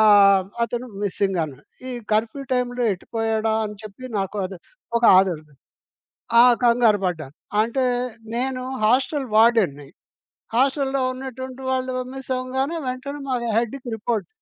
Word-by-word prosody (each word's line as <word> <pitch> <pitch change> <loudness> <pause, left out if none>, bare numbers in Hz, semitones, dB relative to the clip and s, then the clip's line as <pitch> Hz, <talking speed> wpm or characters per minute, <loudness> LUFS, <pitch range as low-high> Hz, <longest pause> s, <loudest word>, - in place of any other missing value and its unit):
ఆహ్, 200 -3 +6 0.2
అతను 240 +2 -4 0.2
మిస్సింగన్నాడు. 180 -8 -1 0.3
ఈ - - -4 0.2
కర్ఫ్యూ 225 +6 0
టైమ్‌లో 245 -1 0
ఎటుపోయాడా 225 +2 -1
అని 210 0 -8
చెప్పి 215 +4 -10
నాకు 195 +2 -3
అది 190 -2 -9 0.4
ఒక - - -12 0.2
ఆందోళన 165 -6 0 0.9
ఆ! - - +9 0.2
కంగారుపడ్డాను. 200 - +2 0.3
అంటే 235 +4 0 0.5
నేను 255 +1 -1 0.2
హాస్టల్ 265 +3 +2
వార్దెన్ని. 215 -12 +4 0.7
హాస్టల్లో 270 +1 +1
ఉన్నటువంటి 260 0 -7
వాళ్ళు 255 0 -1 0.2
మిస్సవ్వంగానే 265 +3 -2
వెంటనే, 275 +3 -4
మా 255 - 0 0.2
హెడ్‌కి 240 +2 -2
రిపోర్ట్ 225 0 -2
235 Hz, 110 wpm, -23 LUFS, 200-260 Hz, 0.9 s, ఆ